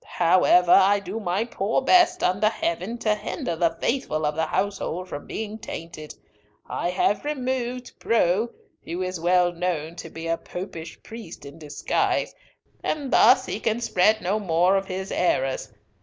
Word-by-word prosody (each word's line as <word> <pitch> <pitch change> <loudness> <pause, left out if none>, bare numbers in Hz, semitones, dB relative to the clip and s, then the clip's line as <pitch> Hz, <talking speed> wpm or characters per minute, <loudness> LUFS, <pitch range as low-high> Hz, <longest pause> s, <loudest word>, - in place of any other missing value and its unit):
However, 180 0 +4
I 195 +1 +6
do 205 +2 -5
my 195 +2 -1
poor 220 -2 -1
best, 355 +4 +4
under 200 +4 +3
Heaven, 190 +2 -3
to 220 -2 +1
hinder 175 -4 -4
the 165 0 0
faithful 195 - -1
of 150 - 0
the 160 +1 -1
household 190 -1 -2
from 145 - -7
being 220 0 -5
tainted. 165 -6 -8 0.5
I 175 - -2
have 195 +3 +1
removed 255 -3 -3
Preaux, 220 0 +2 0.3
who 175 +3 -4
is 185 -1 -4
well 175 +1 +3
known 170 -2 -3
to - - -7
be 165 0 -8
a 165 0 0
Popish 170 -3 -8
priest 220 -10 -10
in 140 +3 -11
disguise, 150 -2 -1 0.5
and 285 -4 -2
thus 255 +2 +6
he 205 - -4
can 225 0 0
spread 215 -1 +2
no 195 +4 0
more 180 0 +2
of 195 0 -1
his 190 +1 -5
errors. 135 -7 0
185 Hz, 160 wpm, -24 LUFS, 170-220 Hz, 0.5 s, I